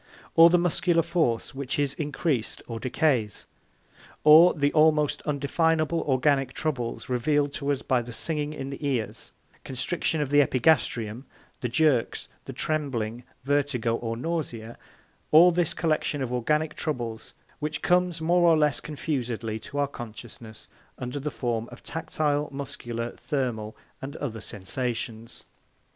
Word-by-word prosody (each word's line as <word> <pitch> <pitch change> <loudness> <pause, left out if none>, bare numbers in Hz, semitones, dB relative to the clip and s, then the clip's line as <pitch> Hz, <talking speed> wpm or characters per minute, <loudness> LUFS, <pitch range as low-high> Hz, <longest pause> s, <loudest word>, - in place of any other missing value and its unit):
Or 165 +1 +9
the 180 - +5
muscular 175 -1 +2
force, 160 -9 0
which 135 0 -4
is 140 -1 +1
increased 145 -5 -2
or 115 -1 -6
decays. 125 - 0 0.8
Or 160 +4 +8
the 145 -2 +1
almost 155 -1 +3
undefinable 155 +3 +1
organic 135 0 +2
troubles 130 -7 -3
revealed 145 +3 +1
to 140 0 -1
us 140 - -2
by 125 -2 +2
the 120 +1 -8
singing 150 +4 -2
in 135 -2 -6
the 140 - -8
ears, 130 -6 -2 0.3
constriction 160 +5 -1
of 145 -2 -2
the 145 0 +6
epigastrium, 130 -4 +1 0.3
the 125 - -2
jerks, 130 -2 +1 0.2
the - - -6
trembling, 125 -7 -2 0.2
vertigo, 135 -5 +1
or 115 -1 -3
nausea 120 -7 -4 0.5
all 170 +4 +8
this 175 -2 0
collection 155 -3 0
of 125 -1 -3
organic 150 +5 0
troubles 120 -8 -4 0.2
which 155 0 -3
comes 180 -1 +2
more 175 +2 +4
or 165 - +5
less 150 -2 +2
confusedly 120 -7 -3
to 140 - -8
our 145 0 +2
consciousness 115 -3 -10 0.3
under 125 +3 -4
the 145 +2 -3
form 120 -4 -3
of - - -12
tactile, 150 -2 -1
muscular, 120 -4 -5
thermal, 120 -7 -3 0.2
and 140 +3 -6
other 115 -6 -5
sensations. 115 +2 -5
140 Hz, 140 wpm, -26 LUFS, 120-155 Hz, 0.8 s, Or